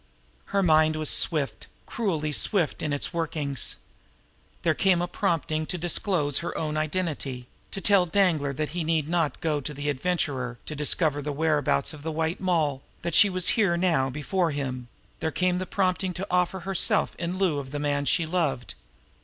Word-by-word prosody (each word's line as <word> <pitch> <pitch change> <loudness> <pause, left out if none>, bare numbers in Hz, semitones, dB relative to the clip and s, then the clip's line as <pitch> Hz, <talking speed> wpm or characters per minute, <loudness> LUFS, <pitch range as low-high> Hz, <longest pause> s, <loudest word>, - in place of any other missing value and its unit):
Her 200 -1 0
mind 155 -2 +4
was 155 -1 +2
swift, 150 -5 +1 0.2
cruelly 165 -10 -1
swift, 170 +2 +1
in 150 - -2
its 145 +5 -1
workings 155 -5 -2
now. - - -32
There 160 - +3
came 185 +3 +3
the 175 +1 -1
prompting 155 -2 -1
to 180 - -3
disclose 170 -3 0
her 170 - -4
own 155 -1 -2
identity 155 -5 -2 0.2
to 195 - -6
tell 195 -3 +4
Danglar 165 -7 +2
that 150 +2 -2
he 175 0 -3
need 160 -2 0
not 165 -4 0
go 155 -4 0
to 150 +2 -6
the 145 +1 -2
Adventurer 135 -5 -1
to 155 - -6
discover 150 0 +1
the 145 +1 -3
whereabouts 150 - +1
of 150 - -10
the 160 +2 -3
White 160 +2 -1
Moll, 160 -7 0 0.2
that 170 - -2
she 205 +3 +7
was 185 -1 +1
here 195 -7 +2
now 165 -7 +2
before 165 +6 -1
him; 130 -4 -4 0.3
there 160 - -1
came 180 +3 0
the 185 - -4
prompting 185 -1 0
to 190 - -3
offer 180 +1 +1
herself 190 0 +1
in 175 +2 -3
lieu 180 -7 +1
of 135 -2 -7
the 145 - -4
man 145 -1 0
she 165 +3 +2
loved. 155 -7 -1
160 Hz, 185 wpm, -26 LUFS, 145-180 Hz, 0.3 s, she